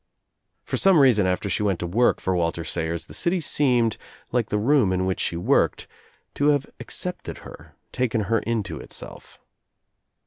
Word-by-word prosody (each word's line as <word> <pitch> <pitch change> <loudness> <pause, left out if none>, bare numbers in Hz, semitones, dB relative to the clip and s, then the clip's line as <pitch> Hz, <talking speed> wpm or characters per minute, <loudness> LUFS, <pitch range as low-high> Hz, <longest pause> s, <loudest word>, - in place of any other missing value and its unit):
For - - -3
some 195 -3 +5
reason 120 -9 +5
after 90 +2 -1
she 95 +1 -1
went 100 -4 +1
to - - -2
work, 115 +8 +2
for 95 - -1
Walter 85 -1 -1
Sayers 85 0 -3
the - - -13
city 175 +1 0
seemed, 125 -7 +2 0.3
like 120 -3 0
the 105 - 0
room 120 -2 +3
in 95 0 0
which 95 0 -1
she 85 - -1
worked, 85 - +1 0.5
to 145 - +1
have 145 -1 +3
accepted 180 0 -4
her, - - -13 0.2
taken 120 -3 0
her 110 +3 +1
into 105 -9 -3
itself. - - -10
105 Hz, 170 wpm, -24 LUFS, 90-130 Hz, 0.5 s, some